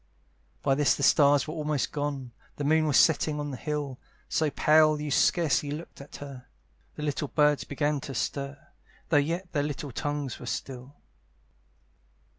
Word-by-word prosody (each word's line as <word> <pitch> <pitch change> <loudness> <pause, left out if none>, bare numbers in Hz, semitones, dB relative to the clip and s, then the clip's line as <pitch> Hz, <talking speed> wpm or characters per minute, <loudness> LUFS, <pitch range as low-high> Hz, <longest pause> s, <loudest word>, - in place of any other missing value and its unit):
By 135 - +3
this 135 -2 +3
the 140 - -4
stars 145 0 +5
were 155 - -4
almost 150 -4 -1
gone, 145 -4 -3 0.2
The 145 - -4
moon 155 +2 +3
was 145 - +3
setting 155 -1 +3
on 145 -1 -3
the - - -4
hill, 145 -2 -4 0.3
So 155 -1 +1
pale 155 +1 +4
you 150 -1 -4
scarcely 150 -2 +2
looked 150 0 -7
at 140 - -12
her: 135 -3 -9 0.5
The 150 - -6
little 145 0 -2
birds 150 0 +2
began 145 +1 -1
to 135 0 -7
stir, 140 +3 -3 0.5
Though 155 - +4
yet 170 +5 -1
their 150 -2 0
tongues 145 0 -4
were 125 - -9
still. 130 +3 -5
145 Hz, 160 wpm, -28 LUFS, 140-150 Hz, 0.5 s, stars